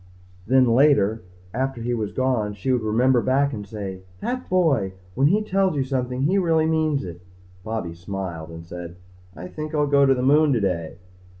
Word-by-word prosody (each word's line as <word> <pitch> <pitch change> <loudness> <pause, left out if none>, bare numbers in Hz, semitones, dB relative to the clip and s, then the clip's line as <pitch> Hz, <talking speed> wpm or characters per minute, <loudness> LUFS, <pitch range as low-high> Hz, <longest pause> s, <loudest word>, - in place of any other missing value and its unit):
Then 130 +2 +5
later, 115 -4 +3 0.3
after 130 +1 -2
he 120 +1 -2
was 110 -3 -2
gone, 120 -6 -1
she 105 +7 -2
would 125 - +1
remember 120 +4 +2
back 140 +3 +1
and 105 -3 -6
say, 100 -3 -6 0.2
That 255 - -4
boy! 150 - +2 0.2
When 135 +6 +3
he 210 +7 +2
tells 195 -4 +1
you 140 - +1
something 130 -1 -2
he 185 +7 +2
really 165 -3 +2
means 155 -5 0
it. 85 -1 -9 0.4
Bobby 110 -6 -4
smiled 85 -2 -6
and 85 0 -10
said, 85 0 -8 0.4
"I 90 +3 -8
think 155 - -6
I'll 150 -1 +2
go 140 -1 +4
to 135 - +4
the 125 - -2
moon 145 +2 +4
today." 90 -9 -1
125 Hz, 185 wpm, -23 LUFS, 100-145 Hz, 0.4 s, Then